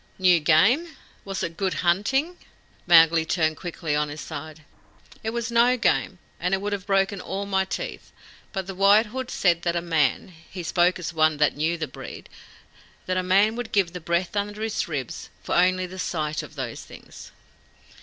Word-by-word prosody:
"New 180 -2 +5
game? 225 - +3 0.3
Was 195 -1 -4
it 165 - -4
good 190 -2 -1
hunting?" 265 - +1 0.5
Mowgli 165 -1 +6
turned 160 -1 0
quickly 170 -4 -3
on 150 0 0
his 150 +1 -7
side. 155 0 -8 0.6
"It 220 - -1
was 235 +1 -3
no 240 +2 +4
game, 195 -5 +1 0.2
and 180 +2 0
would 205 +1 -3
have 200 -1 -5
broken 195 0 +1
all 195 +1 -4
my 190 -1 0
teeth; - - -6 0.4
but 190 -2 -3
the 195 - -6
White 200 +4 +5
Hood 255 +3 -6
said 170 -3 +2
that 170 0 -1
a - - +2
man 160 -3 0
he 175 +1 -10
spoke 175 +2 +2
as 175 -1 -5
one 155 -1 +3
that 150 0 +2
knew 160 +3 0
the 155 -2 -3
breed - - -10 0.8
that 185 - -1
a 185 - +1
man 195 +4 +3
would 240 -1 -5
give 190 -4 +1
the 180 - -6
breath 170 +4 -1
under 205 +1 -2
his 220 -3 -2
ribs 140 -7 -5
for - - -3
only 185 +1 +3
the 185 +1 -9
sight 155 -4 -2
of - - -12
those 130 -5 -5
things." - - -13
185 Hz, 185 wpm, -24 LUFS, 165-200 Hz, 0.8 s, Mowgli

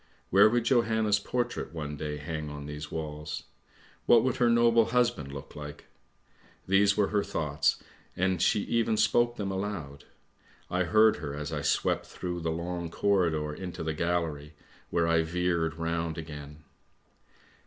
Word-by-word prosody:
Where 100 +3 +7
would 120 +1 +1
Johanna's 110 -4 +2
portrait 120 -6 -3
one 75 -2 -4
day 75 0 -4
hang 75 +1 -5
on 75 -1 -7
these 75 0 -6
walls? 75 -1 -5 0.6
What 115 -2 +7
would 130 -2 0
her 120 -1 +3
noble 115 -1 +5
husband 120 - 0
look 70 0 -9
like? 75 -1 -8 0.8
These 100 +1 +4
were 105 -2 +2
her 105 -1 +1
thoughts, 75 -2 0 0.4
and 90 -1 +1
she 100 - +3
even 115 0 +1
spoke 120 +2 +3
them 100 -4 -3
aloud; 95 -8 -5 0.7
I 90 0 +1
heard 110 +4 +5
her 70 -2 -5
as 75 0 -5
I - - -2
swept - - 0
through 90 -1 -5
the 80 -1 -2
long 85 +1 -3
corridor 85 -6 +1
into 90 0 -6
the 80 -1 -1
gallery, 80 -3 -2 0.3
where 85 -1 +1
I 85 0 +3
veered 85 -1 0
round 85 -1 -2
again. 75 -1 -8
85 Hz, 155 wpm, -29 LUFS, 75-105 Hz, 0.8 s, Where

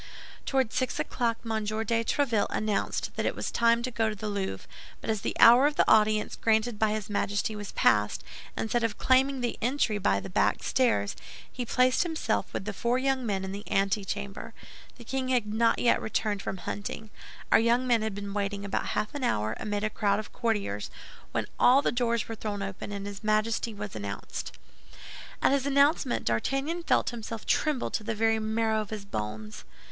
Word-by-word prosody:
Toward 265 -4 +1
six 255 -1 -1
o'clock 235 -2 0
M. 220 -1 -1
de 225 +2 0
Tréville 235 -4 +1
announced 215 -1 -1
that - - -1
it - - -1
was - - -3
time 235 0 +3
to 255 - -2
go 225 -1 +1
to 215 - -4
the 210 +1 -4
Louvre; 195 - -3 0.3
but - - -2
as 215 -2 -2
the - - -2
hour 245 +5 +8
of 295 - -3
audience 215 0 +3
granted 220 0 +1
by 220 - +3
his 215 -1 -2
Majesty 205 +1 -1
was 205 -1 -6
past, 105 -1 +2 0.3
instead 230 +2 0
of 225 -2 -1
claiming 265 +1 +3
the 240 - -2
entrée 235 -4 +1
by 200 - +2
the - - -7
back 190 - +1
stairs, 100 - +1 0.4
he 245 -2 -5
placed 255 +2 +3
himself 325 -3 -1
with - - -4
the 210 - -3
four 235 +5 0
young 265 0 0
men 195 -2 -1
in 190 - -5
the 200 +1 -6
antechamber. 195 0 -1 0.4
The 240 - -11
king 260 +2 -2
had 250 -4 +2
not 230 +1 +3
yet 240 - +3
returned 210 -2 -1
from 190 - -4
hunting. 205 +3 -6 0.4
Our - - +7
young 235 +3 +2
men 240 -3 +3
had 215 -2 -2
been 200 0 -5
waiting 200 0 -2
about 200 - -2
half 210 - -1
an 285 -2 -4
hour, 110 - 0
amid 205 -1 -2
a 215 - +1
crowd 200 -2 +1
of 215 - -6
courtiers, 205 - -1 0.4
when - - -1
all 265 +3 +6
the - - +2
doors 235 -2 0
were 225 - -5
thrown 205 -2 -4
open, 195 +1 -6
and 200 -1 -5
his 205 +1 -7
Majesty 215 +2 +1
was 210 -1 -7
announced. 100 -1 -5 0.9
At - - +5
his 275 0 +1
announcement 280 -1 +2
D'Artagnan 270 - 0
felt 335 - +2
himself 225 -1 -6
tremble 300 -5 +1
to 220 - -2
the 225 +1 -2
very 225 +1 +2
marrow 220 0 0
of 210 - -7
his 210 -2 -6
bones. 105 - -5
220 Hz, 195 wpm, -28 LUFS, 205-240 Hz, 0.9 s, hour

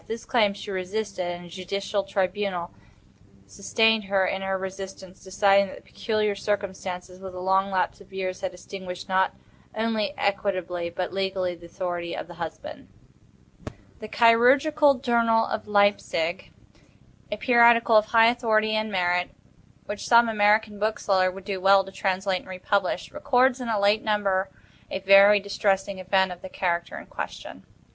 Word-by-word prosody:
This 230 +1 -6
claim 210 -5 +2
she 200 - -8
resisted, 190 0 -4
and 175 0 -6
a - - -12
judicial 195 +3 -3
tribunal 195 -2 -2 0.7
sustained 225 -2 +1
her 195 -1 +1
in 190 +1 -2
her 195 0 -1
resistance, 190 -1 -8
deciding 195 +1 +3
that - - -10
the - - -14
peculiar 215 -2 -2
circumstances, 190 -3 -4
with 190 -1 -9
the 180 - -7
long 190 +1 +1
lapse 190 0 -1
of 195 - -18
years, 185 -1 -4
had 190 - -3
extinguished, 180 0 -9
not 190 0 +1 0.4
only 225 +4 -1
equitably, 185 -4 -2
but 180 +1 -4
legally, 190 -2 -2
the 170 0 -13
authority 175 -1 -4
of - - -5
the 175 - -12
husband. 170 - -8 1.1
The 215 - -8
"Chirurgical 275 +7 +4
Journal" 230 -2 +2
of 215 - -5
Leipsic, 200 -4 +1 0.8
a 210 - -2
periodical 235 -1 +5
of 215 0 +6
high 225 +1 +5
authority 220 -3 +1
and 215 0 -1
merit, 180 -1 0 0.6
which 205 0 -6
some 235 0 +6
American 210 -1 +2
bookseller 200 -3 +1
would 190 +1 -10
do 195 -2 -4
well 195 +1 +5
to 195 - -12
translate 190 -1 -1
and - - -16
republish, 185 +1 -2
records 255 0 +1
in 240 - -4
a 215 -2 0
late 205 +2 +2
number 200 -3 0 0.4
a - - -3
very 195 +2 +6
distressing 195 -1 -1
event 190 0 +1
of 180 0 -9
the 190 - -9
character 175 -2 -2
in - - -9
question. - - -8
195 Hz, 155 wpm, -25 LUFS, 185-215 Hz, 1.1 s, of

